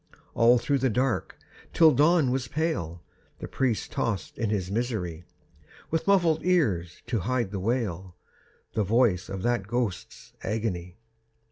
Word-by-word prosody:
All 120 Hz, +2 st, +5 dB
through 140 Hz, +3 st, 0 dB
the 130 Hz, 0 st, +2 dB
dark, 125 Hz, +2 st, -1 dB, 0.4 s
till 160 Hz, -2 st, +6 dB
dawn 150 Hz, -2 st, +3 dB
was 130 Hz, -2 st, -1 dB
pale, 100 Hz, -, -2 dB, 0.3 s
The -, -, -7 dB
priest 125 Hz, -5 st, -1 dB
tossed 105 Hz, -6 st, -2 dB
in 115 Hz, -3 st, 0 dB
his 95 Hz, -3 st, -2 dB
misery, 100 Hz, -8 st, -3 dB, 0.7 s
With 160 Hz, +3 st, -1 dB
muffled 170 Hz, -5 st, +3 dB
ears 105 Hz, -, 0 dB
to 120 Hz, -2 st, -1 dB
hide 120 Hz, 0 st, -1 dB
the 100 Hz, -, -3 dB
wail, 95 Hz, -5 st, -2 dB, 0.6 s
The 110 Hz, -, +1 dB
voice 105 Hz, -3 st, +2 dB
of 95 Hz, -1 st, -5 dB
that 120 Hz, -5 st, 0 dB
ghost's 120 Hz, -5 st, -4 dB
agony. 95 Hz, -5 st, -3 dB
115 Hz, 140 wpm, -27 LUFS, 95-130 Hz, 0.7 s, till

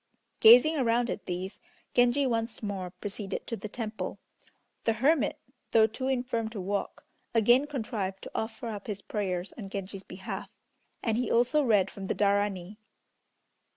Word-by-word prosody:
Gazing 250 Hz, +8 st, +8 dB
around 240 Hz, -2 st, +2 dB
at -, -, -6 dB
these 185 Hz, +3 st, -4 dB, 0.3 s
Genji 245 Hz, +3 st, +4 dB
once 230 Hz, -2 st, -1 dB
more 195 Hz, -3 st, -3 dB
proceeded 200 Hz, +1 st, -5 dB
to 230 Hz, -, -3 dB
the 215 Hz, -, -7 dB
temple. 220 Hz, -1 st, -4 dB, 0.7 s
The 225 Hz, -, +3 dB
hermit 275 Hz, +7 st, +2 dB, 0.4 s
though 220 Hz, -1 st, +7 dB
too 230 Hz, +4 st, -3 dB
infirm 245 Hz, -4 st, 0 dB
to 220 Hz, -2 st, -6 dB
walk 200 Hz, +2 st, -3 dB, 0.3 s
again 240 Hz, +5 st, +5 dB
contrived 215 Hz, -8 st, -3 dB
to -, -, -8 dB
offer 220 Hz, +1 st, -3 dB
up 205 Hz, -2 st, -6 dB
his 200 Hz, -2 st, -4 dB
prayers 185 Hz, -3 st, -2 dB
on 195 Hz, -3 st, -6 dB
Genji's 195 Hz, -1 st, -5 dB
behalf, 190 Hz, 0 st, -7 dB, 0.5 s
and 225 Hz, -2 st, +1 dB
he 250 Hz, -, -1 dB
also 245 Hz, +6 st, +3 dB
read 210 Hz, -7 st, +3 dB
from 195 Hz, -1 st, -7 dB
the -, -, -1 dB
Darani. 200 Hz, -1 st, +1 dB
220 Hz, 155 wpm, -29 LUFS, 200-240 Hz, 0.7 s, Gazing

